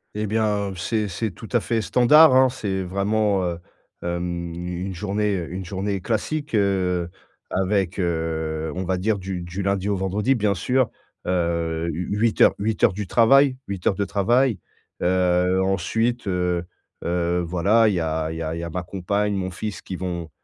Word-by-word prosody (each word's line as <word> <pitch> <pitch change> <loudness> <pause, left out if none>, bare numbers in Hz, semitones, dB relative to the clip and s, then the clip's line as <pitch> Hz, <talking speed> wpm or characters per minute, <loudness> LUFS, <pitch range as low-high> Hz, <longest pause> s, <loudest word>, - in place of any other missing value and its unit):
Et 105 0 -2
bien, 105 -2 0
heu, 95 - -7
c'est 105 +4 -1
c'est 100 +3 -3
tout 110 +5 -11
à 120 - +5
fait 115 +1 -1
standard, 130 +6 +6
hein. 130 0 +6
C'est 100 -7 -3
vraiment, 100 +1 +1
heu 85 -1 -3 0.4
hem 85 -1 -3
u 90 +1 -5
une 95 - -4
journée 105 +2 -1
heu, 85 -1 -5
une 95 0 -5
journée 95 +1 -3
classique, 145 +8 -2
heu, 90 -4 +1 0.4
avec, 95 -1 0
heu, 80 -2 -2
on 95 - -2
va 95 0 -1
dire 105 +3 0
du 95 -1 -5
du 90 +3 -5
lundi 100 0 0
au 100 - +1
vendredi 100 +7 0
bien 105 -3 +1
sûr, 125 +5 +1 0.3
heu, 85 -2 -1
u 85 +3 -4
8 115 +1 +1
heures, - - +7
8 110 +1 -1
heures - - +5
du 100 -1 -5
travail, 130 +3 +5
8 95 -3 -3
heures 95 - +3
de 100 - -1
travail. 120 +4 +2 0.4
Heu, 90 +1 +2
ensuite, 110 +5 0
heu 90 -1 0 0.4
heu, 85 0 0
voilà, 90 +7 +3
il 100 - 0
y - - 0
a 80 0 -1
il - - -5
y 80 - -3
a 80 - -3
il 85 - -4
y - - -5
a 85 - -4
ma 90 +2 -4
compagne, 100 +3 -1
mon 95 -1 -2
fils 100 +3 -5
qui 95 - -6
vont 85 -3 -4
95 Hz, 195 wpm, -23 LUFS, 90-105 Hz, 0.4 s, heures